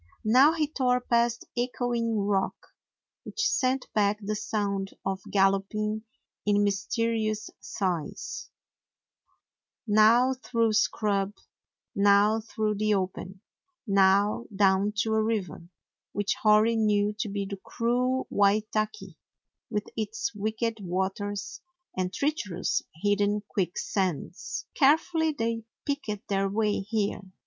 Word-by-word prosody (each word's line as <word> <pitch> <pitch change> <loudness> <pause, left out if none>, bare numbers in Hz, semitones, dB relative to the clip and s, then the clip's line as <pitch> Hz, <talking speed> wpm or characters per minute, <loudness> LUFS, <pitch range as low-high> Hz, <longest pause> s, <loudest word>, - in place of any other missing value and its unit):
Now 260 +8 +6
he 315 -2 +1
tore 255 -4 +1
past 235 -1 +1
Echoing 240 -2 -1
Rock, 200 -1 0 0.7
which 395 -3 -1
sent 265 -6 +1
back 205 -1 +2
the 215 0 -3
sound 200 -2 -2
of 195 0 -2
galloping 205 +2 +1 0.4
in 205 0 +3
mysterious 215 +2 -1
sighs; 180 -6 -4 1.4
now 225 +4 +5
through 230 -3 0
scrub, 205 -1 +1 0.6
now 205 +2 +4
through 215 -1 -2
the 215 -1 +2
open; 190 0 -4 0.4
now 200 +2 +3
down 195 +1 +3
to 220 - -1
a 220 - +3
river, 195 -7 -3 0.4
which 205 0 0
Hori 215 +2 +5
knew 210 -1 +2
to 215 - -1
be 200 0 -2
the 200 0 -6
cruel 250 +2 0
Waitaki, 215 - 0 0.5
with 210 0 -2
its 220 +4 -3
wicked 220 +2 -2
waters 190 +2 -3 0.3
and 185 -1 -1
treacherous, 205 - -1 0.2
hidden 205 0 +2
quick 180 -3 -2
sands. 185 -7 -3
Carefully 320 +2 +3
they 230 -3 -2 0.2
picked 225 -8 -3
their 195 -1 0
way 210 +1 0
here. 205 0 -2
210 Hz, 110 wpm, -27 LUFS, 200-230 Hz, 1.4 s, Now